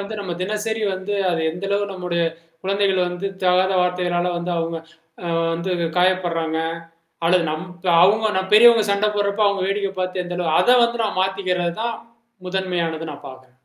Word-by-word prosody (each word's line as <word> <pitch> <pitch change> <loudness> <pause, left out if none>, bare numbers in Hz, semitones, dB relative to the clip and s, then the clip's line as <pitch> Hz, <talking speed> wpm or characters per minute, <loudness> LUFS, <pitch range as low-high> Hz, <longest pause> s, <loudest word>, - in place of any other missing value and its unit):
வந்து 200 +2 -6
நம்ம 190 -3 -5
தினசரி 215 +2 -2
வந்து 190 +2 -4 0.2
அது 170 -2 -1
எந்த 180 +4 -7
அளவு 200 0 +1
நம்முடைய 180 -2 -2 0.4
குழந்தைகள் 195 -1 +1
வந்து 180 +3 -4 0.2
தகாத 185 +1 +3
வார்த்தைகளால 180 0 0
வந்து 175 +1 -3
அவுங்க 165 0 -2 0.5
ஆ 170 -1 -1 0.2
வந்து 170 +3 -3 0.3
காயப்படுறாங்க 175 -3 +1 0.7
அல்லது 175 0 +3
நம் 155 +4 -4 0.4
அவுங்க 215 +3 +3
நம் 190 0 -2
பெரியவுங்க 230 +1 +8
சண்ட 200 +1 +2
போடுறப்ப, 205 +1 0
அவுங்க 200 -2 0
வேடிக்கை 195 0 -1
பார்த்து 185 0 -2
எந்த 175 0 -5
அளவு 165 -3 +1
அத 250 0 +5
வந்து 235 0 -1
நான் 205 - -2
மாத்திக்கிறதுதான் 190 +3 -1 0.5
முதன்மையானது 175 -4 -2
நான் 145 - -11
பார்க்கிறேன். 130 -1 -14
185 Hz, 160 wpm, -21 LUFS, 175-200 Hz, 0.7 s, பெரியவுங்க